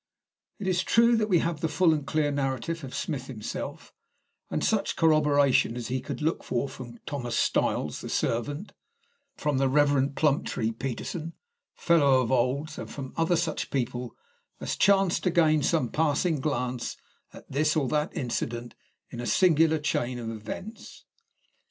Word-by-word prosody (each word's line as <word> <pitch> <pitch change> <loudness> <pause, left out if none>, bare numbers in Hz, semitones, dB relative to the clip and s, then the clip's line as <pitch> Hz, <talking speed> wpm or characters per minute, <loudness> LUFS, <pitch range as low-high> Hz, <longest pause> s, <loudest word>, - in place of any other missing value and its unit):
It 205 - -6
is 185 -1 +2
true 235 +3 +4
that 215 -1 0
we 180 - +5
have 165 -2 -2
the 165 - +1
full 170 0 +3
and 145 -3 -3
clear 150 0 +1
narrative 140 +3 -2
of 130 - -7
Smith 140 -8 -3
himself, 110 -5 -6 0.6
and - - -2
such - - +1
corroboration 145 -6 +3
as 120 -2 -5
he 130 0 -1
could 145 - -5
look 160 +2 0
for 120 +3 -1
from 125 -3 -9
Thomas 125 -5 -3
Styles 75 - 0
the - - -6
servant, 145 - -2 0.7
from 145 -3 0
the 135 -1 +2
Reverend 140 -1 +3
Plumptree 135 -6 +1
Peterson, 135 +8 -5 0.4
Fellow 145 -6 +4
of 125 - -2
Old's, 135 +5 0
and - - -6
from 135 -2 -7
such - - -6
other 165 -1 +1
people 125 -2 -3 0.4
as - - -3
chanced 195 -3 +3
to - - +4
gain 160 -3 +3
some 145 -4 +1
passing 155 +1 +1
glance 125 -4 -2 0.3
at - - -14
this 150 +3 +1
or 145 -4 +1
that 150 +3 -1
incident 120 -3 -3 0.4
in 120 - -7
a 120 - -4
singular 165 -3 +4
chain 125 -4 -1
of 115 -2 -4
events. 185 - -8
145 Hz, 160 wpm, -27 LUFS, 125-160 Hz, 0.7 s, we